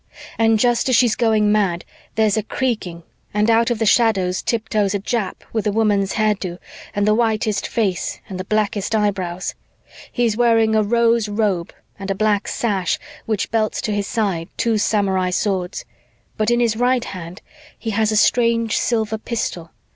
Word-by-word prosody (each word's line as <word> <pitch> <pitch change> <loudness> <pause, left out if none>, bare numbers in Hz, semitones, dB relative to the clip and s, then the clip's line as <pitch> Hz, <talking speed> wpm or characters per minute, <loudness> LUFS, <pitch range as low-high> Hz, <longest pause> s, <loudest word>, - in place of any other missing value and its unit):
"And 225 -1 +4
just 240 +2 +2
as 255 - +4
she's 230 -2 +4
going 215 -3 +2
mad, 195 -5 +1 0.3
there's 215 -2 +2
a 220 - +1
creaking 210 -7 -3 0.3
and 210 +2 +3
out 230 +1 +3
of 240 - 0
the 225 - 0
shadows 195 -5 +2
tiptoes 210 -3 0
a - - 0
Jap 210 0 -3
with 220 -1 -1
a - - +2
woman's 205 -2 +1
hairdo 205 -5 0 0.4
and 205 0 +1
the 215 - +5
whitest 215 -2 0
face 195 -6 -1
and 190 -4 -6
the - - -3
blackest 210 +1 -1
eyebrows. 190 -4 -1 0.6
He's 235 -3 +1
wearing 225 -2 +3
a 215 - +4
rose 230 0 +2
robe 205 -5 -1 0.3
and 195 0 -6
a 195 - 0
black 210 0 +1
sash 195 -7 -1 0.3
which 215 -3 -1
belts 220 -2 0
to 215 - -2
his 205 -1 -2
sides 195 -7 -1
two 225 -2 +1
samurai 195 -3 +1
swords, 185 -1 -2 0.5
but 215 +1 0
in 240 0 +2
his 230 -2 +2
right 245 +1 +1
hand 180 0 -8 0.3
he 225 - -4
has 220 +1 +1
a - - 0
strange 230 -1 +2
silver 220 -2 -1
pistol. 180 -8 -4
215 Hz, 170 wpm, -20 LUFS, 195-225 Hz, 0.6 s, the